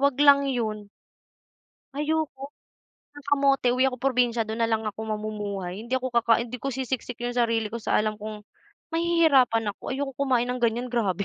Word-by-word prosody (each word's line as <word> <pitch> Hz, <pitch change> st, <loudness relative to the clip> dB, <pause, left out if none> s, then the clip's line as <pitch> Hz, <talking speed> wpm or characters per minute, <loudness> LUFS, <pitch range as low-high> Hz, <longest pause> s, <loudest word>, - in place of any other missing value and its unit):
wag 280 Hz, -2 st, +2 dB
lang 280 Hz, -1 st, +6 dB
yun. 215 Hz, -5 st, -2 dB, 1.1 s
Ayoko 295 Hz, -2 st, -2 dB, 0.7 s
ng 290 Hz, -, -11 dB
kamote 275 Hz, -3 st, +3 dB
uwi 255 Hz, +1 st, +3 dB
ako 255 Hz, -, -5 dB
probinsya 245 Hz, -3 st, +1 dB
dun 220 Hz, +2 st, -5 dB
nalang 225 Hz, -1 st, +1 dB
ako 215 Hz, 0 st, -4 dB
mamumuhay. 210 Hz, -3 st, -4 dB
Hindi 240 Hz, +3 st, -2 dB
ako 260 Hz, -1 st, -3 dB
kakain 235 Hz, 0 st, +3 dB
hindi 250 Hz, +1 st, -7 dB
ko 275 Hz, -, -3 dB
sisiksik 255 Hz, -2 st, -3 dB
yung 245 Hz, -, -1 dB
sarili 230 Hz, -3 st, 0 dB
ko 235 Hz, -, -4 dB
sa -, -, +1 dB
alam 215 Hz, 0 st, 0 dB
kong 215 Hz, -1 st, -7 dB, 0.5 s
mahihirapan 290 Hz, -11 st, +3 dB
ako. -, -, -10 dB
Ayaw 275 Hz, +2 st, -1 dB
kong 270 Hz, -, -13 dB
kumain 245 Hz, -2 st, +3 dB
ng 250 Hz, -, -5 dB
ganyan, 240 Hz, +2 st, 0 dB
grabe. 200 Hz, -5 st, 0 dB
240 Hz, 175 wpm, -26 LUFS, 220-270 Hz, 1.1 s, lang